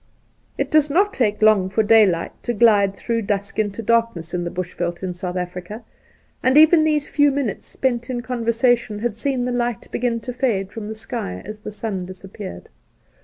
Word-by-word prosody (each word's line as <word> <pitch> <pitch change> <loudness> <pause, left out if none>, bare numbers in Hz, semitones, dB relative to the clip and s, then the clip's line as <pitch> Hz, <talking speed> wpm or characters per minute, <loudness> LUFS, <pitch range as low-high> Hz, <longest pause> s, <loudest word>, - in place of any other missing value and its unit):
It - - -2
does 305 -1 +4
not 390 +8 +2
take 215 -4 0
long 210 -4 +5
for 220 +3 +1
daylight 205 -6 +4
to 240 - -2
glide 205 -3 +4
through 230 +2 -2
dusk 200 -1 -2
into 210 +1 -1
darkness 230 -7 0
in 175 -1 -1
the 175 - -3
bush 180 0 -5
veld 175 +1 -3
in 185 -1 -2
South 180 0 -5
Africa, 180 +5 -6 0.6
and 260 +2 +3
even 315 +1 +7
these 300 -2 +1
few 290 -1 +3
minutes 275 -6 -3
spent 240 -2 -2
in 245 -2 -2
conversation 235 -2 +1
had 225 0 -2
seen 255 +1 -1
the 250 - -1
light 240 -2 -2
begin 240 -1 -1
to 250 - -6
fade 215 -7 -1
from 220 -2 -7
the 220 - -5
sky 220 - -4
as 215 +1 -8
the 210 - -7
sun 205 -4 -4
disappeared. 190 +1 -9
220 Hz, 190 wpm, -21 LUFS, 195-245 Hz, 0.6 s, even